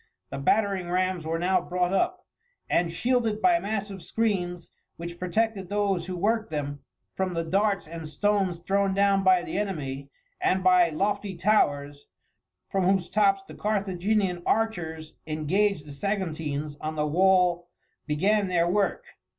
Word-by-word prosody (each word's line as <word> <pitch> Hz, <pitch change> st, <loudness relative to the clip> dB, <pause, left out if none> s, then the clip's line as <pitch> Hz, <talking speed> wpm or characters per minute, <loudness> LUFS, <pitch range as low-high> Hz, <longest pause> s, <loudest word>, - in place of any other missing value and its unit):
The -, -, -4 dB
battering 195 Hz, +3 st, +1 dB
rams 185 Hz, -2 st, 0 dB
were 165 Hz, +1 st, 0 dB
now 180 Hz, +2 st, +2 dB
brought 180 Hz, +1 st, -1 dB
up, 365 Hz, -, 0 dB, 0.4 s
and 170 Hz, -1 st, +1 dB
shielded 230 Hz, +2 st, 0 dB
by 350 Hz, +3 st, +4 dB
massive 200 Hz, -, -4 dB
screens, 180 Hz, -7 st, -2 dB, 0.3 s
which 170 Hz, +1 st, -7 dB
protected 195 Hz, +1 st, -1 dB
those 200 Hz, -3 st, 0 dB
who 185 Hz, -, -4 dB
worked 220 Hz, +4 st, 0 dB
them 145 Hz, -2 st, -4 dB, 0.3 s
from 185 Hz, -2 st, -2 dB
the 165 Hz, -, 0 dB
darts 195 Hz, +4 st, +1 dB
and 165 Hz, -1 st, -7 dB
stones 190 Hz, +1 st, 0 dB
thrown 195 Hz, +1 st, +1 dB
down 200 Hz, 0 st, +3 dB
by 185 Hz, -2 st, +4 dB
the 190 Hz, -, -3 dB
enemy, 140 Hz, -9 st, -4 dB, 0.3 s
and 185 Hz, 0 st, +1 dB
by 180 Hz, -2 st, +5 dB
lofty 200 Hz, +4 st, -1 dB
towers, 145 Hz, -7 st, +1 dB, 0.6 s
from 190 Hz, -2 st, 0 dB
whose 190 Hz, -1 st, +2 dB
tops 195 Hz, -2 st, +3 dB
the -, -, -10 dB
Carthaginian 195 Hz, -2 st, 0 dB
archers 165 Hz, -9 st, -1 dB
engaged 155 Hz, +3 st, 0 dB
the 145 Hz, -, -10 dB
Saguntines 155 Hz, -4 st, -3 dB
on 155 Hz, 0 st, -3 dB
the 150 Hz, -1 st, 0 dB
wall 180 Hz, +1 st, +3 dB, 0.4 s
began 195 Hz, +7 st, +2 dB
their 175 Hz, -2 st, +2 dB
work. 200 Hz, -, 0 dB
185 Hz, 145 wpm, -26 LUFS, 165-200 Hz, 0.6 s, by